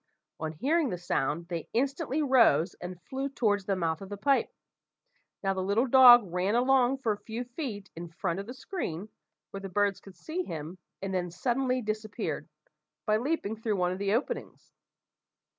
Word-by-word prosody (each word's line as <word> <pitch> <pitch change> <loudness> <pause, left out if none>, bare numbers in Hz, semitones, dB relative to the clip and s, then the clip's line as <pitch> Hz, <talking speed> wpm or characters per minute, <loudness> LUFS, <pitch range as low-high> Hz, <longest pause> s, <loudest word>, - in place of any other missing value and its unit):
On 160 0 -3
hearing 290 - +1
the 180 - -3
sound, 170 -1 -1
they 170 -3 -4
instantly 280 +4 0
rose 230 - +4
and 180 0 -6
flew 270 - -3
towards 205 -7 0
the 195 - 0
mouth 165 -2 -1
of 195 - -8
the 205 - -5
pipe. 275 +7 +2 0.9
Now 195 0 +2
the 190 - -2
little 200 +6 +2
dog 245 -2 +9
ran 185 +4 +1
along 255 +1 +3
for 225 - +2
a 210 - -2
few 230 +2 -5
feet 240 - -6
in 170 +1 -7
front 170 +2 -3
of 200 - -6
the 245 - -6
screen, 215 - -5 0.4
where 195 - -6
the 195 - -6
birds 200 +1 +1
could 195 -2 -14
see 335 +3 -3
him, 165 - -6 0.2
and 195 -1 -3
then 180 -1 -1
suddenly 250 +7 0
disappeared, 215 0 -3 0.6
by 215 -1 +3
leaping 240 -4 -1
through 220 -1 -1
one 180 -1 +1
of 185 - -4
the 200 +1 +1
openings. 455 - -4
210 Hz, 180 wpm, -29 LUFS, 185-255 Hz, 0.9 s, dog